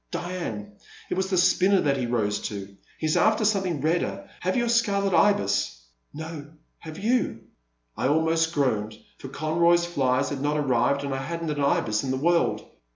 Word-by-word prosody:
Diane, 110 - -5 0.3
it - - +2
was 190 +1 -1
the 185 - +1
spinner 185 +2 +4
that 140 -2 +1
he 125 -2 -2
rose 105 -4 0
to. 100 -1 -8 0.2
He 155 - -2
's 155 - +1
after 220 0 +3
something 190 -8 0
redder. 115 - -1
Have 185 +5 -1
you 240 - +1
a - - -3
Scarlet 200 -5 +1
Ibis? 100 - +2
' - - -40
' - - -48
*' - - -45
No 155 -2 -9
— - - -46
have 155 0 -8
you?" 235 +5 0 0.5
I - - 0
almost 160 +2 +2
groaned, 110 -8 -1 0.2
for - - -8
Conroy's 170 +4 +2
flies 140 -5 0
had 140 -2 -4
not 145 +1 0
arrived, 140 0 +1
and 140 -1 -3
I 135 - -2
had 165 +4 -5
n't 160 - -2
an 145 -1 -2
Ibis 110 -6 +1
in 135 - -3
the 130 - 0
world. 170 +5 +1
150 Hz, 205 wpm, -25 LUFS, 125-175 Hz, 0.5 s, spinner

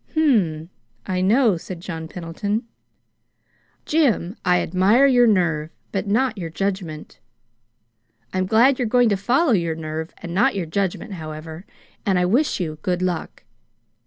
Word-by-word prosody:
"Hm 310 -4 +4 0.3
m, 165 - -14 0.4
I 185 -1 -1
know," 215 0 +3
said 175 +1 -8
John 165 -2 -6
Pendleton. 180 +7 -3 1.2
"Jim, 245 - +1
I 180 -1 +3
admire 195 +9 +3
your 245 -3 +5
nerve, 165 -7 +1 0.2
but 195 0 -2
not 225 +1 +1
your 170 -2 -4
judgment. 180 -3 -4 1.1
I'm 185 0 0
glad 240 +6 +4
you're 245 - 0
going 245 +1 +4
to 205 - +2
follow 250 - +2
your 170 -6 +1
nerve 160 0 -5
and 170 -1 -7
not 250 +7 +2
your 190 -3 -2
judgment, 195 +4 -2
however 155 +3 -8 0.4
and 195 -2 +1
I 180 - +2
wish 245 +10 +1
you 155 -4 -4
good 180 +1 -1
luck." 180 -3 -3
185 Hz, 150 wpm, -22 LUFS, 165-230 Hz, 1.2 s, your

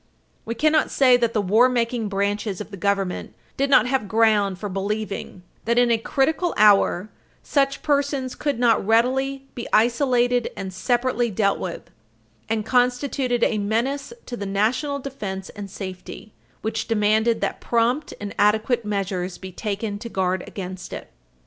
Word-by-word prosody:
We 230 - -3
cannot 310 +4 +2
say 255 -2 +5
that 235 -2 0
the 215 - +1
war 220 +7 +4
making 235 -3 -1
branches 200 0 -1
of - - -7
the - - -6
Government 195 -1 -2 0.2
did 275 +1 0
not 245 -5 +6
have 250 -4 0
ground 210 -3 +2
for 205 - -5
believing 200 -1 -4 0.2
that, 235 +1 +1
in 245 -1 +4
a 230 - +3
critical 310 +9 0
hour, 205 -1 +4 0.3
such 275 -1 0
persons 280 -3 0
could 290 -4 -2
not 235 -2 +3
readily 265 +5 +1
be 240 - -6
isolated 245 +1 +2
and 190 -1 -5
separately 245 +4 0
dealt 200 -1 +1
with, 175 - -6 0.6
and 220 -1 -1
constituted 250 0 +1
a 215 - +2
menace 235 - -1
to 245 - -5
the 200 -4 -5
national 250 +9 0
defense 205 -9 -6
and 200 -1 -8
safety 190 +2 -8 0.3
which 220 0 -2
demanded 220 +1 +2
that - - -2
prompt 240 +5 0
and 205 -1 -6
adequate 220 +4 +2
measures 190 -3 -3
be 190 -1 -9
taken 205 +1 -4
to 235 - -7
guard 185 -3 -1
against 185 -1 -7
it." - - -8
225 Hz, 155 wpm, -23 LUFS, 200-250 Hz, 0.6 s, not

